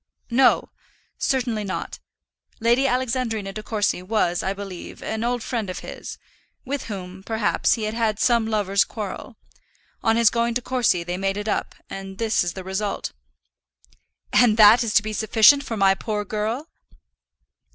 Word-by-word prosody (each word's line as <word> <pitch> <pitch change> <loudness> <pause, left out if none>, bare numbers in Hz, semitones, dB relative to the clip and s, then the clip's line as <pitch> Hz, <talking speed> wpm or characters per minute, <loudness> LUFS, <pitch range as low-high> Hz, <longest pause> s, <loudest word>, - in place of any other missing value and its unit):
"No; 255 +2 +3 0.5
certainly 240 -5 0
not. 195 - -5 0.6
Lady 240 +4 +3
Alexandrina 235 -5 -1
De 215 - -5
Courcy 210 -4 -1
was, 185 -3 0
I 190 - -1
believe, 195 -2 -8
an 220 +1 -3
old 240 -1 -1
friend 225 -6 -3
of 180 - -5
his; - - -8 0.5
with 280 +1 -3
whom, 190 -3 -7
perhaps, 220 +1 +1
he 225 - -5
had 215 0 -2
had 220 -2 0
some 235 -3 +3
lover's 200 -3 +2
quarrel. 215 +2 -7 0.6
On 225 0 +2
his 230 -2 +5
going 235 0 0
to 250 - 0
Courcy 240 -9 +1
they 175 +1 -4
made 195 +1 -1
it 205 +1 -4
up; - - -2
and 195 0 -8
this 225 -3 +1
is 175 -1 -3
the 190 - -7
result." 190 +2 -3 1.2
"And 225 -3 +5
that 220 +2 +8
is 220 -2 -2
to 200 - +5
be 215 0 -4
sufficient 220 +6 +5
for 230 -4 -4
my 195 -1 +5
poor 210 +1 -3
girl?" 220 +9 -3
215 Hz, 160 wpm, -23 LUFS, 195-235 Hz, 1.2 s, that